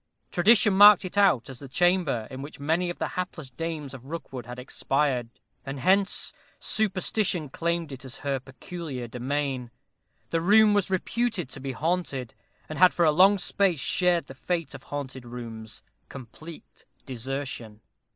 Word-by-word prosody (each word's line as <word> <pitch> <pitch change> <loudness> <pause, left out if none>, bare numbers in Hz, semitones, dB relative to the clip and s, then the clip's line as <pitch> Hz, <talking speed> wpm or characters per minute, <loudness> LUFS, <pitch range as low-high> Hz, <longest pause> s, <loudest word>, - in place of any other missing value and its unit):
Tradition 200 +2 +5
marked 205 0 +8
it 185 - -7
out 195 - +4
as 130 -2 -9
the 140 - -9
chamber 155 -6 +1
in 130 0 -6
which 145 +1 -9
many 165 +5 0
of 175 - -5
the - - -2
hapless 175 -7 -5
dames 155 -2 -5
of 130 -1 -10
Rookwood 135 -6 -7
had 125 0 -7
expired; 130 -1 -1 0.3
and 135 0 -6
hence 190 +7 +2 0.2
Superstition 190 -5 0
claimed 170 +1 -2
it 130 -1 -8
as 130 -1 -8
her 135 -1 0
peculiar 135 0 -7
domain. 130 +1 -3 0.6
The 165 - +1
room 210 +4 +6
was 205 -2 +1
reputed 200 - -1
to - - -7
be 135 0 -4
haunted, 150 -6 -2 0.3
and 155 - -6
had 185 0 +6
for 170 - +3
a 155 - +5
long 190 +6 +6
space 180 -1 +1
shared 180 +3 +2
the - - -10
fate 165 +4 -3
of 135 - -9
haunted 135 -3 -5
rooms 115 -2 -8 0.3
complete 140 +6 -12 0.2
desertion. 125 -4 -5
150 Hz, 160 wpm, -26 LUFS, 130-180 Hz, 0.6 s, marked